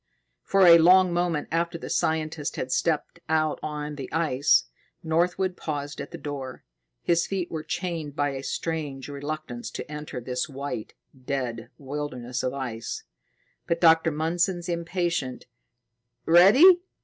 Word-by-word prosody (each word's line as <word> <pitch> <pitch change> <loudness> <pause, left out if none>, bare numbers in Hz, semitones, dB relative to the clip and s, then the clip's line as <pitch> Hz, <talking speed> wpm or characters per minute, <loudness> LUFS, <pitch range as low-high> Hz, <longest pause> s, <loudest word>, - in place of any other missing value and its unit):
For 195 -1 +3
a 170 -1 +9
long 180 +2 +6
moment 175 -3 0
after 170 +1 0
the - - -8
scientist 155 -1 -1
had 130 - -4
stepped 160 +3 0
out 155 -1 +1
on 150 -1 -5
the 135 - -7
ice, 150 -4 +3 0.4
Northwood 175 +3 +1
paused 145 -3 -5
at - - -7
the - - -8
door. 135 -4 -6 0.4
His 170 0 +2
feet 190 -3 -3
were 160 - -3
chained 165 -3 -4
by 145 -1 +1
a 135 -1 -5
strange 145 -2 -4
reluctance 145 -4 -5
to 145 - -7
enter 150 -3 -6
this 125 +1 -3
white, 140 -5 -6 0.3
dead 125 -5 -3
wilderness 130 -3 -4
of 130 - -1
ice. 125 -4 -5 0.6
But 170 - 0
Dr. 165 -1 +5
Mundson's 170 +3 -1
impatient, 170 -5 -2 0.8
"Ready?" 255 - +7
155 Hz, 135 wpm, -26 LUFS, 140-170 Hz, 0.8 s, a